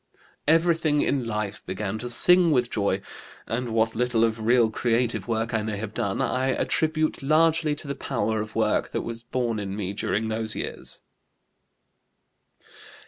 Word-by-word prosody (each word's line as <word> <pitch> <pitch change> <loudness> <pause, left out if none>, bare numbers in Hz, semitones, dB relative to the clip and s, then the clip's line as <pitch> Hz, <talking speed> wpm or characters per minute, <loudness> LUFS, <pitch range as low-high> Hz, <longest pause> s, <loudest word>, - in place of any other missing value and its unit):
"Everything 160 -2 +3
in 130 -4 0
life 105 -2 -3
began 100 +2 -4
to 120 +2 -3
sing 180 +8 +5
with 125 -5 +1
joy, 100 -2 0 0.4
and 120 +1 -3
what 110 0 +1
little 120 -1 +1
of 115 -1 0
real 115 0 +3
creative 120 +1 0
work 115 0 -1
I 115 - +1
may 105 -1 -3
have 105 0 -5
done 100 -2 -1
I 130 +1 0
attribute 155 +3 0
largely 155 +1 +3
to 150 - -7
the 140 - -2
power 110 -5 -2
of 110 0 -8
work 110 -1 +1
that - - -1
was 115 0 -6
born 120 -2 -2
in 100 -1 -4
me 100 -2 -3
during 105 +1 -1
those 110 0 0
years." - - -3
115 Hz, 160 wpm, -25 LUFS, 110-135 Hz, 0.4 s, sing